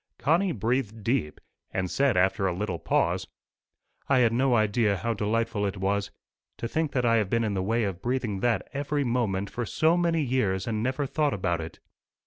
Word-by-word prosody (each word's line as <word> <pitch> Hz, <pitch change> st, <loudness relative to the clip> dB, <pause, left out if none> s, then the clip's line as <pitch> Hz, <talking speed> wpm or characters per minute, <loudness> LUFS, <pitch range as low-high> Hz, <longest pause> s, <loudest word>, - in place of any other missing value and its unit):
Connie 175 Hz, +5 st, +2 dB
breathed 115 Hz, -, -1 dB
deep, 115 Hz, -, -1 dB, 0.3 s
and 95 Hz, -1 st, -1 dB
said 135 Hz, +3 st, +1 dB
after 95 Hz, +2 st, +2 dB
a 90 Hz, -, 0 dB
little 95 Hz, -3 st, -3 dB
pause, -, -, 0 dB, 0.8 s
"I 135 Hz, -, +4 dB
had 120 Hz, -3 st, +4 dB
no 130 Hz, +1 st, +3 dB
idea 110 Hz, -1 st, +2 dB
how 115 Hz, +3 st, -1 dB
delightful 110 Hz, 0 st, -1 dB
it 100 Hz, 0 st, -2 dB
was. 100 Hz, +1 st, 0 dB, 0.5 s
To 115 Hz, -, -3 dB
think 155 Hz, +4 st, -1 dB
that 125 Hz, -2 st, +1 dB
I 115 Hz, -1 st, +4 dB
have 105 Hz, -4 st, 0 dB
been 115 Hz, +2 st, +1 dB
in 105 Hz, -2 st, -1 dB
the 95 Hz, -, -1 dB
way 115 Hz, +5 st, +1 dB
of 95 Hz, -3 st, -3 dB
breathing 120 Hz, -5 st, -1 dB
that 120 Hz, +2 st, 0 dB
every 145 Hz, +1 st, -1 dB
moment 110 Hz, -6 st, -1 dB
for 120 Hz, -, -3 dB
so 160 Hz, +8 st, +2 dB
many 170 Hz, -2 st, +1 dB
years 105 Hz, -8 st, 0 dB
and 110 Hz, -2 st, -2 dB
never 130 Hz, +4 st, -1 dB
thought 145 Hz, -1 st, 0 dB
about 85 Hz, -3 st, -1 dB
it!" 80 Hz, -, -8 dB
115 Hz, 195 wpm, -27 LUFS, 100-130 Hz, 0.8 s, I